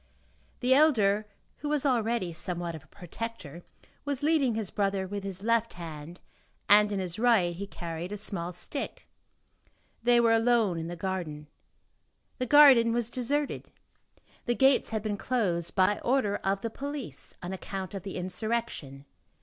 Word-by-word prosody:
The 255 +1 +4
elder, 215 -8 +4 0.3
who 295 - -4
was 295 -1 0
already 230 -8 +1
somewhat 170 +1 -4
of 160 -2 -9
a - - -24
protector, 175 -3 -7 0.4
was 285 -1 -3
leading 290 -7 +2
his 220 -4 -3
brother 195 -1 0
with 200 +1 -5
his 195 -1 -6
left 230 0 +1
hand 165 0 -8 0.5
and 210 0 +6
in 200 - -1
his 185 0 -5
right 220 -8 +3
he 200 +3 -6
carried 170 0 -6
a 210 - -4
small 180 -4 -3
stick. 180 - -5 0.9
They 240 +1 +4
were 230 -1 +4
alone 225 -6 +2
in 165 - -4
the 175 - -5
garden. 170 -5 -4 0.9
The 255 - -1
garden 260 -5 +7
was 235 -1 -1
deserted, 280 +4 -2 0.8
the 240 - +2
gates 265 +1 +4
had 220 -2 -3
been 210 -2 -2
closed 185 -9 -1
by 190 +1 +3
order 235 -5 +1
of 195 0 -1
the 230 - -3
police, 280 +1 -6
on 180 +2 -4
account 190 0 -6
of 195 - -5
the 195 +1 -7
insurrection. 180 - -3
205 Hz, 160 wpm, -29 LUFS, 180-240 Hz, 0.9 s, garden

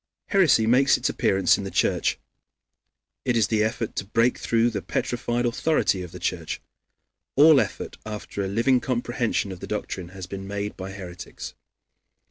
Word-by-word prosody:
Heresy 170 - +4
makes 130 +4 +4
its - - 0
appearance 95 -1 +2
in - - -4
the 95 - -4
Church. - - +1 1.1
It 120 -1 +1
is 110 -4 +2
the 110 -1 +2
effort 110 0 -2
to - - 0
break 115 +5 +1
through 115 +1 +2
the 100 -3 -3
petrified 120 +3 -1
authority 120 -5 +1
of 90 -2 -7
the 90 - -8
Church. 85 -2 -3 0.8
All 150 0 +7
effort - - -5
after 105 -1 -5
a - - -2
living 115 +6 +2
comprehension 120 -4 -1
of 90 - -8
the - - -7
doctrine 90 -2 -4
has 95 0 -8
been 95 +1 -7
made 100 +1 -4
by 95 0 -6
heretics. 90 -3 -8
110 Hz, 165 wpm, -25 LUFS, 95-120 Hz, 1.1 s, All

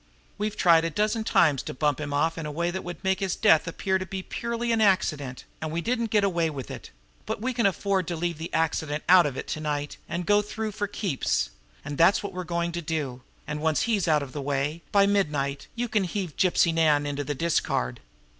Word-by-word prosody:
We've 210 0 -2
tried 165 -2 +5
a 165 - 0
dozen 215 +6 0
times 150 - +3
to - - -7
bump 150 +1 0
him 145 -1 -4
off 160 +3 +1
in 160 -2 -5
a - - -4
way 170 +3 -1
that 190 - -4
would 175 +1 -7
make 190 0 +1
his 195 -2 -1
death 160 +1 +4
appear 190 +3 0
to 185 - -4
be 190 0 -5
due - - -28
purely 235 0 -2
to - - +3
an 225 - +2
accident, 155 -10 +1 0.2
and 155 -1 -3
we 165 - -1
didn't 230 +4 -1
get 210 -2 +3
away 170 -4 +1
with 135 -6 -6
it; - - -8 0.4
but - - -2
we 255 +4 -2
can 235 -3 +3
afford 195 -2 0
to 175 - -2
leave 170 -1 -2
the 165 - -5
'accident' 155 -2 -1
out 180 -3 +7
of 135 -2 -5
it - - -5
to - - -2
night, 145 -1 -3
and 170 +1 -3
go 205 +2 +4
through 215 +1 -4
for 205 0 -2
keeps 190 - -1 0.3
and 145 -1 -5
that's 170 +5 +5
what 200 -1 -5
we're 180 0 -4
going 170 0 -1
to 170 0 -4
do. 150 -6 -3 0.2
And 150 +1 -4
once 160 -1 +2
he's 210 -6 +1
out 150 -2 +3
of 130 -2 -9
the 145 - -4
way 140 +3 -1
by 200 -1 +5
midnight 150 -9 0
you 240 +1 -1
can 210 -4 +1
heave 180 -3 -4
Gypsy 175 -2 +3
Nan 155 -3 +3
into 145 0 -2
the 145 +1 -3
discard." 130 - 0
170 Hz, 240 wpm, -26 LUFS, 150-200 Hz, 0.4 s, out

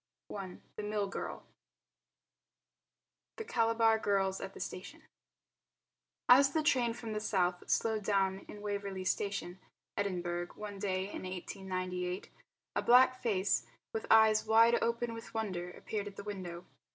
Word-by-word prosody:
THE 195 +1 -7
MILL 210 -1 -1
GIRL - - -5 1.9
The 450 - -5
Calabar 225 - +3
Girls 195 -2 +1
at 195 0 -6
the - - -9
Station 290 - -7 1.2
As 270 +2 +7
the 315 - +1
train 245 -6 +2
from 230 -2 -5
the 215 - -1
south 180 -4 0
slowed 220 -2 +1
down 195 -1 +1
in 205 0 -10
Waverley 200 -2 -3
Station, 190 -1 -2 0.4
Edinburgh, 175 -3 -2
one 205 -2 -7
day 190 -2 0
in 195 - -6
1898, 185 0 -4 0.4
a - - +2
black 255 +1 +6
face, 200 -4 +1 0.3
with 220 - -3
eyes 220 -1 +6
wide 230 +2 +6
open 235 0 0
with 230 0 -9
wonder, 185 -6 -2
appeared 205 +3 -5
at 200 - -8
the - - -7
window. 180 -4 -6
205 Hz, 135 wpm, -33 LUFS, 185-225 Hz, 1.9 s, As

